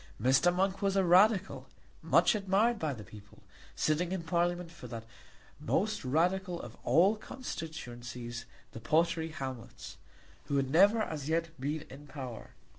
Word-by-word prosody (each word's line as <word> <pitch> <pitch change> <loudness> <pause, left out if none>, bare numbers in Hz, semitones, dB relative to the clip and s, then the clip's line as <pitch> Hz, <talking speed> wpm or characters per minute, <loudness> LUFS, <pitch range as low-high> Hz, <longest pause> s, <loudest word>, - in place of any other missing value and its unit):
Mr. 135 +9 +4
Monk 190 +2 0
was 195 -1 +1
a 195 - +3
Radical, 190 +3 +4 0.3
much - - +4
admired 210 +3 +2
by 155 -2 -1
the 115 -6 -7
people, 105 -1 -15 0.3
sitting 165 +3 0
in 190 -3 -2
Parliament 175 +1 0
for 170 - -10
that 115 -2 -7 0.5
most - - 0
Radical 175 +6 0
of 120 -1 -9
all 175 - +4
constituencies, 120 - -7 0.3
the - - -8
Pottery 160 +5 +1
Hamlets, 130 -6 -7 0.5
who 140 - 0
had 135 -1 0
never 205 +7 +5
as 155 -6 -5
yet 165 +1 0
been 150 +3 -2
in 145 +3 -11
power. 130 -5 -8
160 Hz, 145 wpm, -31 LUFS, 130-190 Hz, 0.5 s, never